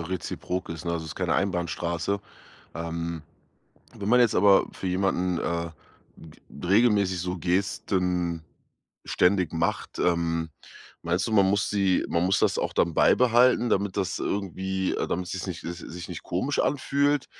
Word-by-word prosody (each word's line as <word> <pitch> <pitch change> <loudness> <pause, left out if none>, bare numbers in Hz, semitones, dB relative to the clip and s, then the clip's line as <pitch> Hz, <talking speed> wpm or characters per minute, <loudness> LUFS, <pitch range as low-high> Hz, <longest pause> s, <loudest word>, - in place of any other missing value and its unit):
reziprok 90 +1 -4
ist, 80 0 -6
ne, 85 - -1
also, 80 -1 -3
ist 75 - -7
keine - - -1
Einbahnstraße. 85 0 -1 0.5
Ähm, 85 -1 -4 0.7
wenn 100 - -5
man 125 - +6
jetzt 120 -3 +4
aber 100 +1 +5
für 95 - -6
jemanden, 90 -1 0
äh, 85 -1 -2 0.5
g 80 - -14 0.3
regelmäßig 100 -3 +3
so 90 +1 -3
Gesten 90 -1 -1 0.6
ständig 90 -2 +2
macht, 80 - -2
ähm, 85 -2 0 0.5
meinst 85 +2 0
du, 110 - -3
man 100 -3 +5
muss 100 +1 +1
sie 100 -3 +2
man 85 +1 +1
muss 95 +2 +2
das - - +2
auch - - -1
dann 85 -2 +1
beibehalten, 120 +2 +4
damit 100 0 0
das 95 - -1
irgendwie 95 -1 -2
äh, - - -1
damit 90 0 -2
sich's 95 0 -4
nicht 90 -3 -5
es 85 +1 -5
sich 85 0 -8
nicht 90 - -7
komisch 130 +12 -2
anfühlt, 140 0 +1
90 Hz, 155 wpm, -26 LUFS, 85-100 Hz, 0.7 s, man